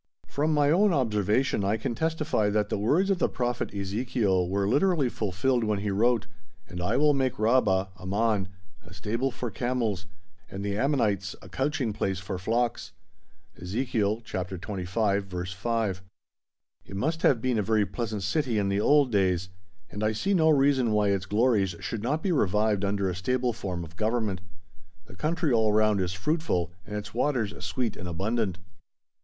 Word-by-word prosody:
From 150 +3 0
my 145 -1 +3
own 195 +3 +4
observation 110 - +1
I 100 +3 +1
can 110 - -3
testify 155 -7 0
that 105 0 0
the - - -1
words 165 - +2
of 190 - +1
the - - +2
Prophet 120 -1 -2
Ezekiel 100 -2 0
were 100 +1 0
literally 145 - +2
fulfilled 115 +4 0
when 105 -1 0
he 105 0 -1
wrote: 115 +2 +2 0.4
"And 90 0 -6
I 90 - +1
will 150 0 +4
make 130 -2 0
Rabbah 105 -4 +2
(Ammon) 100 +1 0 0.4
a 85 0 -14
stable 115 +8 -1
for 120 -2 -5
camels, 115 -6 -2 0.4
and 100 +1 -5
the 100 0 -1
Ammonites 105 -6 0
a - - -11
couching 135 -5 -1
place 95 -3 -1
for 95 0 -5
flocks." 115 +5 -1 0.7
(Ezekiel, 110 +2 -1
Chap. 95 -5 -4
XXV. 100 +2 -1
verse 90 -1 -5
5.) 105 -1 -1 0.8
It 100 - -10
must 160 +10 -1
have 130 - +4
been 125 -1 0
a - - +3
very 105 0 +2
pleasant 105 +1 -4
city 120 +3 0
in 100 -1 +1
the 100 +1 +1
old 145 0 +4
days, 95 -3 +1 0.4
and 105 - -4
I 110 +1 +2
see 195 - 0
no 160 -4 +4
reason 135 -5 +3
why 105 -1 +3
its 95 -1 0
glories 105 -4 +2
should 115 - -4
not 145 +8 -1
be 195 - +1
revived 105 - +2
under 100 -1 0
a 90 - -1
stable 125 +7 0
form 90 -5 -4
of 85 0 -12
Government. 110 -4 -1 0.6
The 95 - -14
country 155 - 0
all 110 -2 +3
round 105 -1 +3
is 90 0 -1
fruitful 90 - -1 0.2
and 105 - -5
its 105 0 -5
waters 120 -4 0
sweet 110 +5 -2
and 90 - -7
abundant. 95 +2 -1
110 Hz, 175 wpm, -27 LUFS, 95-125 Hz, 0.8 s, own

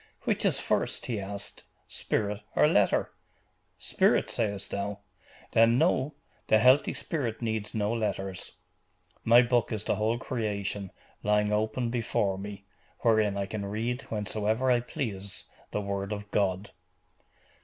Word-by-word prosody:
"Which - - 0
is - - +3
first," - - -1
he 115 -4 -2
asked, 100 +1 -6 0.2
"spirit, 105 -1 -2
or - - +6
letter? - - +3 0.7
Spirit, - - +2
sayest 100 -3 -2
thou? 100 0 -2 0.5
Then 115 +1 +5
know, 135 +3 +2 0.3
the 110 - +6
healthy 130 +6 +5
spirit 125 -9 -2
needs 110 -2 -2
no 105 +1 +1
letters. 95 -4 -3 0.7
My 120 +2 +7
book 120 -2 +1
is 105 -2 -2
the - - 0
whole 110 +2 +1
creation, 100 -5 -3 0.3
lying 105 0 +2
open 110 +3 0
before 105 -5 0
me, 100 0 -7 0.4
wherein 110 -3 +3
I 100 - -1
can 100 +1 -4
read, 115 +5 -2
whensoever 110 +3 0
I 120 - +4
please, 100 -6 -4 0.3
the 105 - -2
word 100 0 -3
of 105 0 -5
God." 100 0 0
105 Hz, 135 wpm, -29 LUFS, 100-115 Hz, 0.7 s, My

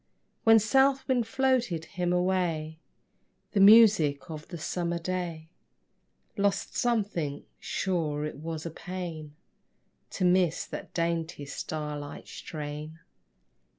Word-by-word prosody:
When 225 0 +8
south 265 +5 +3
wind 245 -4 +1
floated 240 -10 +1
him 175 0 -2
away 175 -4 0 0.7
The 205 - +1
music 195 -8 +6
of 155 0 -7
the 175 0 -7
summer 170 +1 -2
day 170 -2 -4 0.9
Lost 200 -1 0
something: 200 -12 -1
sure 155 -6 -1
it 150 - -6
was 160 +1 -5
a 165 - -4
pain 165 -4 -7 0.8
To 185 - +1
miss 180 -2 +3
that - - -8
dainty 165 -3 -1
star 150 +1 -4
light 145 0 -9
strain. 150 +1 -7
170 Hz, 115 wpm, -28 LUFS, 155-195 Hz, 0.9 s, When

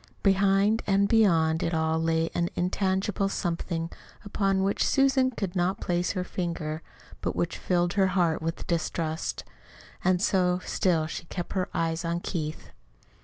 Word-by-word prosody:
Behind 195 +2 +3
and 200 0 +3
beyond 165 -8 +3
it 165 - 0
all 160 0 +1
lay 165 0 +1
an 170 0 0
intangible 190 +2 0
something 170 -3 -2 0.3
upon 195 -1 +1
which 200 +1 +1
Susan 270 -1 +3
could 195 -7 -4
not 180 +1 +1
place 175 0 0
her 185 -2 -2
finger, 165 -4 -3 0.4
but - - -2
which 170 - -2
filled 175 -1 +1
her 195 -2 +3
heart 165 -4 +2
with 165 +1 -3
distrust. 165 -1 -2 0.6
And 185 0 +3
so 180 -2 +2
still 165 -4 +1
she 165 - -6
kept 175 +1 -5
her 185 -2 -1
eyes 165 +1 -1
on 170 0 -1
Keith. 155 -4 -5
180 Hz, 150 wpm, -27 LUFS, 165-195 Hz, 0.6 s, Behind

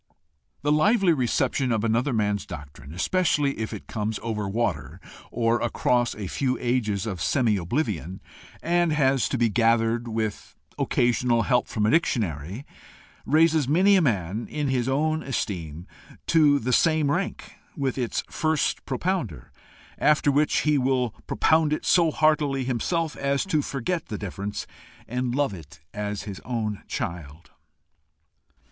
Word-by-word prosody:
The 145 - +2
lively 190 +4 +4
reception 130 -1 0
of 110 -2 0
another 115 +5 +1
man's 105 -6 0
doctrine, 70 -1 -10
especially 145 - +1
if 110 - -3
it 110 - -7
comes 110 0 -3
over 105 -3 -2
water 90 - -2 0.3
or 115 0 +1
across 120 0 +1
a 105 - -6
few 130 +6 -1
ages 115 -5 0
of 95 -7 -4
semi 115 - +2
oblivion, 95 - -2 0.4
and 175 0 +2
has 135 -3 +2
to 130 - -1
be 120 -1 +3
gathered 115 +1 +2
with 110 -2 -4 0.2
occasional 120 -1 +2
help 125 -2 +1
from 105 -2 -1
a 110 - +3
dictionary, 105 - -1 0.6
raises 155 0 +3
many 185 +8 +4
a 190 - +4
man, 105 - -1
in 150 -2 -2
his 130 -1 0
own 155 +4 +1
esteem, 85 - -4 0.4
to 150 -3 +4
the 125 -1 -1
same 155 -2 +3
rank 185 +5 -3 0.2
with 135 -3 -1
its 120 -2 -1
first 155 -1 0
propounder; 130 - -3 0.5
after 150 -1 +3
which 145 +2 +2
he 150 -2 +2
will 130 -2 +1 0.2
propound 160 -1 +2
it 155 - -2
so 170 -2 +4
heartily 150 -3 +2
himself 150 +6 -1
as 140 +2 0
to 160 -6 +1
forget 150 +5 -3
the 105 - -4
difference, 100 +1 -5 0.4
and 125 0 -2
love 140 -6 +1
it 80 -6 -12
as 105 -1 -4
his 100 -2 -7
own 110 -4 -3
child. 80 -1 -6
125 Hz, 145 wpm, -25 LUFS, 105-150 Hz, 0.6 s, lively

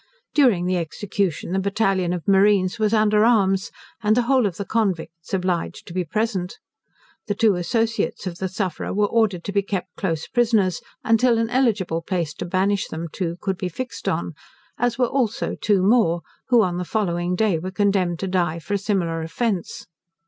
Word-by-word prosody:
During 235 -12 +4
the 185 0 +1
execution 175 +1 -2
the 190 - +1
battalion 195 -2 +1
of 175 -2 -4
marines 195 +1 +3
was 215 -1 +2
under 215 -1 +4
arms, 195 -5 +3 0.3
and 215 +1 +2
the 245 - +3
whole 255 -2 +3
of 180 - -6
the 200 - -4
convicts 175 -7 -2
obliged 185 -2 -2
to 170 - -10
be 185 0 0
present. 195 0 -2 0.7
The 205 - -1
two 215 0 +4
associates 225 +7 -1
of 175 -2 -5
the 190 - -1
sufferer 190 -1 -3
were 210 0 +3
ordered 205 -5 +1
to 200 - -4
be 200 0 +2
kept 195 -2 -4
close 165 -6 -2
prisoners, 220 -7 +1 0.2
until 230 +1 +3
an 230 0 0
eligible 210 -10 +1
place 170 -3 -2
to - - -3
banish 195 +3 0
them 165 +1 -5
to 170 -3 -3
could 190 -3 -2
be 185 - -2
fixed 255 +9 -4
on; - - -2 0.5
as 240 -1 +1
were 250 - +3
also 245 -4 -1
two 200 -3 +1
more, 190 -6 +3 0.3
who 240 -3 +5
on 180 -3 -1
the 180 - -2
following 175 -3 -1
day 195 -4 +1
were 185 +3 -4
condemned 190 -3 +1
to 195 - -1
die 175 -3 0
for 170 +5 -5
a 200 - +1
similar 180 -5 -1
offence. 185 +3 -3
195 Hz, 185 wpm, -22 LUFS, 180-220 Hz, 0.7 s, who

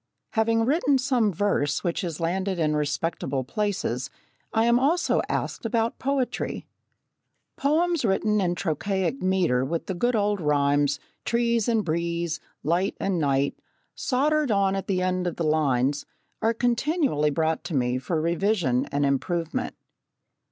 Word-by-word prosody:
Having 225 0 +2
written 285 0 +3
some 250 -5 +2
verse 155 -6 0
which 175 -3 -1
has 170 -4 -4
landed 185 +3 -1
in 155 -2 +1
respectable 145 -2 -1
places, 140 - -2 0.4
I 225 0 +2
am 235 +1 +4
also 315 +7 +2
asked - - -2
about 230 0 0
poetry. 270 -2 -2 0.9
Poems 325 +2 +1
written 210 0 +2
in 175 -2 0
trochaic 190 - -1
metre 185 -9 +2
with 165 +5 -2
the 190 - -3
good 240 +7 +1
old 205 -2 +1
rhymes, 145 -1 +2 0.2
"trees 235 -2 +1
and 225 -3 +1
breeze," 170 0 -1 0.2
"light 175 +5 0
and 190 -3 0
night," 140 -2 +1 0.3
soldered 295 +2 +1
on 195 -2 +2
at 195 - -4
the 185 -2 0
end 185 0 0
of 175 - -2
the 170 - -2
lines, 145 -3 +1 0.3
are 225 +1 +2
continually 245 - +1
brought 160 +2 0
to 165 - -3
me 125 -1 +1
for 160 +5 -2
revision 170 - +1
and 145 0 0
improvement. 165 - -1
185 Hz, 145 wpm, -25 LUFS, 150-230 Hz, 0.9 s, am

